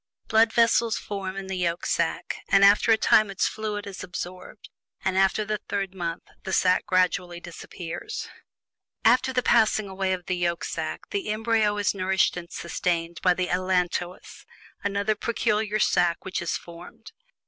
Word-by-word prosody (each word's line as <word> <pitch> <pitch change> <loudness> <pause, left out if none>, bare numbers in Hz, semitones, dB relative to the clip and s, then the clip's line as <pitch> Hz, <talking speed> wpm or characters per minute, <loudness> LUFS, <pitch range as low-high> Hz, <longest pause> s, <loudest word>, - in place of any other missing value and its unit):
Blood 220 0 +4
vessels 230 -1 +3
form 195 -2 -5
in 195 0 -5
this 190 -1 -4
yolk 170 -1 -1
sack, - - -1
and 195 0 +6
after 205 +3 +5
a 220 - +6
time 215 -1 +4
its 195 - 0
fluid 210 -1 -4
is 200 -2 -7
absorbed, 180 +3 -8 0.3
and 190 -1 +1
after 195 +2 +2
the 210 0 -2
third 195 -2 -2
month 170 -3 -4 0.2
the 190 - -5
sack 185 -1 +2
gradually 180 -1 +1
disappears. 175 0 -7 0.8
After 255 +3 +4
the 250 -1 0
passing 215 -2 +3
away 190 0 -2
of 180 -2 -5
the 185 - -1
yolk 175 -1 -1
sack, - - -5
the 400 - -2
embryo 215 -1 +1
is 205 -1 +1
nourished 190 -1 +1
and 175 -1 -7
sustained 170 -1 -2
by 180 -1 +4
the 185 0 -1
"allantois," 180 -1 -1 0.4
another 200 +1 0
peculiar 215 -1 0
sack 175 -4 +2
which 190 -1 -3
is 170 - -1
formed. 175 - -12
190 Hz, 160 wpm, -25 LUFS, 180-215 Hz, 0.8 s, and